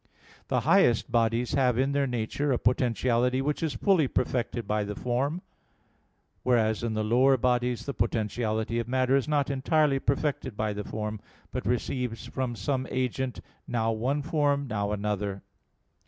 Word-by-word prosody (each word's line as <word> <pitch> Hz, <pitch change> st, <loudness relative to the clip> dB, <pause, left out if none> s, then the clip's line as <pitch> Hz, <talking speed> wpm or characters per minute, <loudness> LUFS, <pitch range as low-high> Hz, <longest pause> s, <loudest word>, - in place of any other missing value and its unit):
The -, -, +1 dB
highest 115 Hz, -2 st, +3 dB
bodies 115 Hz, +1 st, +1 dB
have 125 Hz, -3 st, +2 dB
in 135 Hz, +2 st, +2 dB
their 140 Hz, -1 st, +1 dB
nature 125 Hz, +4 st, -1 dB
a 125 Hz, -, +2 dB
potentiality 125 Hz, +1 st, +1 dB
which 145 Hz, +2 st, -1 dB
is 155 Hz, -6 st, -1 dB
fully 170 Hz, -, +3 dB
perfected 120 Hz, -2 st, -1 dB
by 105 Hz, 0 st, 0 dB
the 105 Hz, 0 st, -5 dB
form; 135 Hz, -, -1 dB, 1.0 s
whereas 110 Hz, -3 st, +2 dB
in 115 Hz, -2 st, -2 dB
the 110 Hz, -, 0 dB
lower 130 Hz, +5 st, +4 dB
bodies 125 Hz, -1 st, 0 dB
the 140 Hz, -, -3 dB
potentiality 110 Hz, 0 st, -1 dB
of 115 Hz, -, -3 dB
matter 130 Hz, +1 st, +2 dB
is 135 Hz, 0 st, +1 dB
not 145 Hz, -2 st, +1 dB
entirely 140 Hz, +1 st, +2 dB
perfected 135 Hz, -4 st, -1 dB
by 110 Hz, -1 st, -1 dB
the 105 Hz, 0 st, -4 dB
form, 105 Hz, 0 st, -4 dB, 0.3 s
but 130 Hz, -, -4 dB
receives 125 Hz, -1 st, -2 dB
from 130 Hz, -2 st, -3 dB
some 130 Hz, +6 st, -2 dB
agent, 130 Hz, 0 st, -2 dB, 0.3 s
now 115 Hz, -1 st, 0 dB
one 130 Hz, +6 st, -1 dB
form, 145 Hz, -2 st, +1 dB
now 105 Hz, -3 st, -1 dB
another. 100 Hz, -1 st, -2 dB
125 Hz, 155 wpm, -28 LUFS, 110-135 Hz, 1.0 s, lower